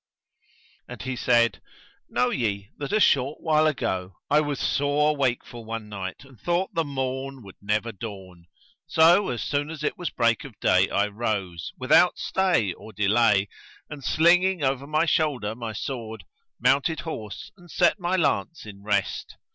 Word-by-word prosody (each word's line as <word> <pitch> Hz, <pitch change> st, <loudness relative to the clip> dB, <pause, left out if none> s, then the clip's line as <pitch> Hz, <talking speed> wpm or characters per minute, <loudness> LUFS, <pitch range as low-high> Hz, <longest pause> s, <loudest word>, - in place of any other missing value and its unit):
And -, -, -8 dB
he 130 Hz, 0 st, -3 dB
said:—Know 120 Hz, 0 st, -1 dB
ye 100 Hz, -4 st, -2 dB
that 145 Hz, -2 st, -4 dB
a 215 Hz, -, +3 dB
short 140 Hz, -6 st, +3 dB
while 155 Hz, -1 st, +3 dB
ago, 95 Hz, -, -2 dB
I 150 Hz, +1 st, +5 dB
was 145 Hz, -2 st, -3 dB
sore 145 Hz, +2 st, +1 dB
wakeful 125 Hz, -3 st, -2 dB
one 110 Hz, -1 st, -6 dB
night 95 Hz, +2 st, -6 dB
and 135 Hz, -5 st, -18 dB
thought 175 Hz, +2 st, -1 dB
the 165 Hz, -, +1 dB
morn 135 Hz, -2 st, -4 dB
would 95 Hz, -2 st, -13 dB
never 105 Hz, +3 st, -1 dB
dawn; 95 Hz, -5 st, -9 dB, 0.4 s
so, 170 Hz, +5 st, +5 dB
as 120 Hz, -3 st, -3 dB
soon 145 Hz, +1 st, -1 dB
as 155 Hz, -2 st, -7 dB
it -, -, -2 dB
was 175 Hz, -, -2 dB
break 115 Hz, 0 st, +1 dB
of 125 Hz, -8 st, -12 dB
day 95 Hz, +1 st, +3 dB
I 100 Hz, -, +2 dB
rose, 100 Hz, -5 st, -3 dB
without 135 Hz, +7 st, +4 dB
stay 180 Hz, -, +1 dB
or 110 Hz, -, -12 dB
delay; 105 Hz, 0 st, +3 dB, 0.4 s
and, 145 Hz, -2 st, -8 dB
slinging 175 Hz, +6 st, +3 dB
over 135 Hz, +1 st, 0 dB
my 155 Hz, +2 st, +2 dB
shoulder 140 Hz, -10 st, 0 dB
my 115 Hz, -1 st, -6 dB
sword, 110 Hz, -3 st, -5 dB, 0.4 s
mounted 140 Hz, +4 st, +2 dB
horse 110 Hz, -10 st, -7 dB
and 175 Hz, -2 st, -18 dB
set 205 Hz, -, +2 dB
my 175 Hz, +1 st, 0 dB
lance 165 Hz, -, 0 dB
in 100 Hz, -2 st, -11 dB
rest. 100 Hz, -1 st, -2 dB
125 Hz, 160 wpm, -25 LUFS, 105-150 Hz, 0.4 s, I